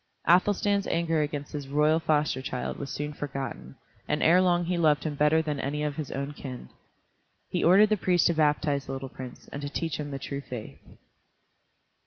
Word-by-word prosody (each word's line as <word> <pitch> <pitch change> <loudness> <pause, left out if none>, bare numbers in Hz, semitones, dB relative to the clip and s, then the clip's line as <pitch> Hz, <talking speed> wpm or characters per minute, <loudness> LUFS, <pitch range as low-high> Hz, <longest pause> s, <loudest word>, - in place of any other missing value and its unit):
Athelstan's 200 +2 +3
anger 165 -2 +1
against 145 -1 -3
his 145 -2 -5
royal 150 +3 +3
foster 150 -4 +1
child 125 -1 -4
was 140 - -5
soon 150 0 -4
forgotten, 135 - -6 0.3
and - - 0
ere 175 +3 +6
long 175 -1 +2
he 180 +1 0
loved 155 -4 +3
him 155 - -2
better 150 +2 +3
than 150 -3 -2
any 150 +3 -2
of 150 -1 -2
his 155 -4 -4
own 140 +2 -4
kin. 130 - -8 0.8
He - - 0
ordered 195 +5 +6
the 215 - +2
priest 180 -3 +2
to 170 - +4
baptize 150 -2 +1
the 135 - -4
little 135 0 -5
prince, 130 -1 -10
and 140 - -6
to 145 - -4
teach 160 +1 -3
him 145 -1 -4
the 140 - -4
true 140 0 -5
faith. 125 -5 -8
150 Hz, 195 wpm, -27 LUFS, 140-165 Hz, 0.8 s, ere